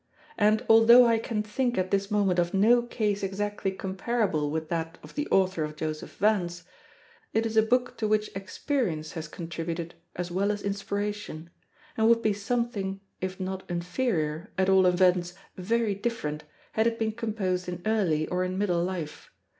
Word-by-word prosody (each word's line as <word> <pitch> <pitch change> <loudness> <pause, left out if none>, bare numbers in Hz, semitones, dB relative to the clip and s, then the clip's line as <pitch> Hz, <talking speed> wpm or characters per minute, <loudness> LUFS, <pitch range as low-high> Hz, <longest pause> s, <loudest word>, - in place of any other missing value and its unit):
And 215 +3 +3
although 230 +2 +8
I 230 -1 +3
can 220 -2 -2
think 240 +3 -1
at 185 0 0
this 200 0 +1
moment 200 -4 +2
of 175 +2 0
no 230 +5 +5
case 215 -4 -1
exactly 200 +1 -2
comparable 190 -4 -1
with 160 +1 -3
that 165 0 -3
of - - -12
the 295 0 -2
author 185 -4 +2
of 150 0 -5
Joseph 155 0 -5
Vance, 180 -5 +1 0.7
it 225 +1 +2
is 225 -1 -2
a 220 - +7
book 245 +2 +1
to 220 - 0
which 215 0 +1
experience 195 - -2
has 160 0 -6
contributed 165 +1 -5 0.2
as 175 0 -4
well 200 +3 +1
as 205 -1 -4
inspiration, 200 -4 -4 0.4
and 220 0 +3
would 230 0 +4
be 215 - +3
something, 205 -2 -2 0.2
if 185 +1 -4
not 190 0 -3
inferior, 170 -2 -1
at 190 0 +2
all 190 -1 +5
events 180 -1 +3 0.2
very 220 +3 0
different, 195 -9 -3 0.3
had 220 +1 +2
it 230 0 0
been 220 -1 0
composed 205 -5 -2
in 175 0 -6
early 185 -9 +1
or 180 0 0
in 185 0 -2
middle 180 -4 +1
life. 175 -4 -5
195 Hz, 170 wpm, -27 LUFS, 175-220 Hz, 0.7 s, although